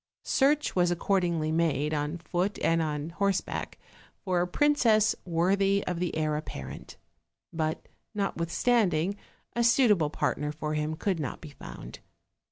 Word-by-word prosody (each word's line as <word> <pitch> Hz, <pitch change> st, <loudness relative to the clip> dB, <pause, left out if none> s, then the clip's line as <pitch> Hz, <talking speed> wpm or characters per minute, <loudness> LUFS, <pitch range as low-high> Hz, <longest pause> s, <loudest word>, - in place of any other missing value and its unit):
Search 290 Hz, +2 st, +2 dB
was 180 Hz, -1 st, +3 dB
accordingly 175 Hz, -3 st, 0 dB
made, 155 Hz, -2 st, +1 dB
on 150 Hz, +2 st, -1 dB
foot 180 Hz, +3 st, -2 dB
and 165 Hz, 0 st, +3 dB
on 150 Hz, 0 st, -3 dB
horse 195 Hz, +2 st, +1 dB
back, -, -, -6 dB, 0.4 s
for 180 Hz, -3 st, 0 dB
a 180 Hz, -, 0 dB
princess 230 Hz, -2 st, +3 dB
worthy 195 Hz, +3 st, +2 dB
of 180 Hz, -2 st, -2 dB
the 180 Hz, -2 st, -2 dB
heir 155 Hz, -1 st, 0 dB
apparent: 150 Hz, -, -7 dB, 0.6 s
but 160 Hz, -1 st, -2 dB, 0.3 s
notwithstanding 195 Hz, -1 st, +1 dB, 0.4 s
a 235 Hz, -, +2 dB
suitable 230 Hz, -, +4 dB
partner 150 Hz, -1 st, -1 dB
for 150 Hz, 0 st, -4 dB
him 155 Hz, +1 st, -1 dB
could 180 Hz, +1 st, -1 dB
not 145 Hz, -, -4 dB
be 155 Hz, -, -10 dB
found. -, -, -10 dB
175 Hz, 140 wpm, -28 LUFS, 155-200 Hz, 0.6 s, suitable